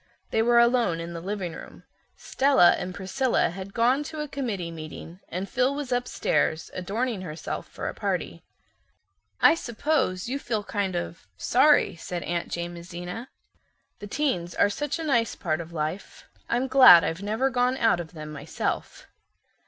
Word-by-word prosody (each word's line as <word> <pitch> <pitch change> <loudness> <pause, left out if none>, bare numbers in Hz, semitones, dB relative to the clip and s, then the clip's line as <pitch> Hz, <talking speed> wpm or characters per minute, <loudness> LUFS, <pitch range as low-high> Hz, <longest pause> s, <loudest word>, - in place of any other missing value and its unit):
They 220 - +2
were 240 +1 +4
alone 235 -8 +3
in 170 +1 -6
the 165 - -6
living 190 -2 -4
room. - - -11 0.3
Stella 270 -10 +4
and 180 0 -3
Priscilla 230 +3 0
had 190 +2 -8
gone 245 +6 +2
to 310 +1 -7
a 300 - -3
committee 215 -12 -3
meeting 165 +2 -9
and 185 +3 -4
Phil 255 +4 +1
was 285 -3 -5
upstairs 245 -9 0
adorning 210 +4 -2
herself 165 -3 -6
for - - -6
a - - -3
party. - - -3 1.0
"I - - +8
suppose 240 - -1
you 270 +3 -2
feel 220 -6 -2
kind 200 -2 -2
of, 170 -1 -5
sorry" 290 -1 +4
said 175 +1 -5
Aunt 170 0 -2
Jamesina. 175 +6 -6 0.7
"The 205 - -7
teens 195 - -1
are 205 - +3
such 295 +8 -2
a 330 - -5
nice 235 -7 +1
part 160 -2 -2
of 165 0 -10
life. 160 +4 -5 0.2
I'm 245 +3 +1
glad 255 -11 +9
I've 165 +3 -2
never 220 +6 0
gone 250 +1 +1
out 225 -8 +3
of 170 0 -7
them 155 -2 -8
myself." 150 +1 -4
200 Hz, 160 wpm, -26 LUFS, 175-255 Hz, 1.0 s, glad